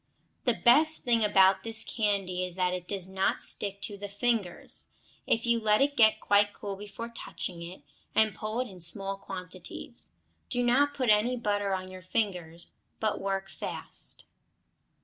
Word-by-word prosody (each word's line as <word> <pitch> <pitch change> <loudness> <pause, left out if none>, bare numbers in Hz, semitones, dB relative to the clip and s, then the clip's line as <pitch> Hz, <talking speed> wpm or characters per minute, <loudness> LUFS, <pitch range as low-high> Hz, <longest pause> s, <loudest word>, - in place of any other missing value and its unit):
The - - +3
best 310 +6 +4
thing 235 -2 +2
about 195 -2 +4
this 225 -1 -2
candy 195 -5 -1
is 180 -1 -6
that 180 -1 0
it 180 -1 -5
does 195 -3 -4
not 190 0 0
stick 200 -1 -3
to 205 -2 -5
the 205 0 -6
fingers, 205 -3 +2 0.3
if 225 - +1
you 235 -1 +2
let 215 -1 +3
it 285 +1 +2
get 220 -4 +5
quite 205 0 +3
cool 200 -1 -6
before 210 +3 -8
touching 175 -6 -6
it, 175 +2 -9 0.3
and 220 -1 +4
pull 215 +4 -4
it 255 - -4
in 190 -4 -12
small 195 +3 +1
quantities. 190 - -6 0.3
Do 245 -1 0
not 280 +4 +3
put 255 -5 +2
any 225 +4 +3
butter 205 -3 -1
on 185 0 -7
your 185 0 -10
fingers, 180 -4 +1 0.2
but 215 -1 -1
work 195 0 -2
fast. - - 0
205 Hz, 170 wpm, -29 LUFS, 190-230 Hz, 0.3 s, get